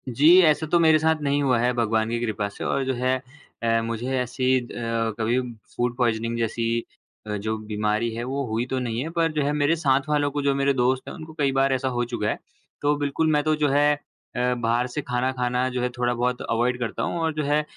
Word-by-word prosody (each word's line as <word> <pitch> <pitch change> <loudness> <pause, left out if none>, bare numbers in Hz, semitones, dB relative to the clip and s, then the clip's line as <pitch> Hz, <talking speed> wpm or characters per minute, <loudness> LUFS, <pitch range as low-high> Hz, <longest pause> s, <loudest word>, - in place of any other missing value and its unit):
जी, 150 +9 +6
ऐसा 155 -2 +3
तो 170 - +3
मेरे 160 -1 +5
साथ 160 +1 +3
नहीं 145 0 +1
हुआ 130 -3 +3
है 120 +1 +2
भगवान 110 -2 +1
की 115 0 -1
कृपा 110 -3 -2
से। - - -8
और 140 - 0
जो 130 - 0
है 130 +1 +1 0.5
अ, 115 0 +2
मुझे 115 +3 -3
ऐसी 130 +1 +1
अ, - - -7 0.6
कभी 115 +3 +1 0.4
फूड 120 0 0
पॉइज़निंग 115 -1 0
जैसी 115 0 -1 0.6
अ, 105 - -2
जो 110 +2 -2
बीमारी 105 +1 -1
है 115 +1 -4
वो 135 +2 -2
हुई 115 +2 -1
तो 130 0 -2
नहीं 120 -2 -2
है, 160 - -4
पर 165 -1 +1
जो 150 -1 0
है 145 - +1
मेरे 150 +2 +2
साथ 140 -3 +1
वालों 145 -1 +1
को, 145 +1 -2
जो 140 -1 +1
मेरे 140 0 +2
दोस्त 130 0 +1
हैं - - -6
उनको 160 -2 -10
कई 140 -2 +2
बार 135 0 +3
ऐसा 130 0 -1
हो 120 -2 0
चुका 105 -3 -1
है। - - -1 0.4
तो 145 0 +2
बिल्कुल 145 +2 0
मैं 150 -1 +2
तो 155 0 +2
जो 150 -1 +1
है 145 +2 +4 0.4
अ, 125 0 +1
बाहर 120 +1 0
से 140 +4 -4
खाना, 125 -1 -1
खाना 125 0 0
जो 125 -1 -3
है 125 - 0
थोड़ा-बहुत 120 0 0
अवॉइड 120 +2 +1
करता 115 -3 -3
हूँ। 170 - -2
और 160 -1 0
जो 150 0 -2
है 145 +1 +2
130 Hz, 235 wpm, -24 LUFS, 120-145 Hz, 0.6 s, जी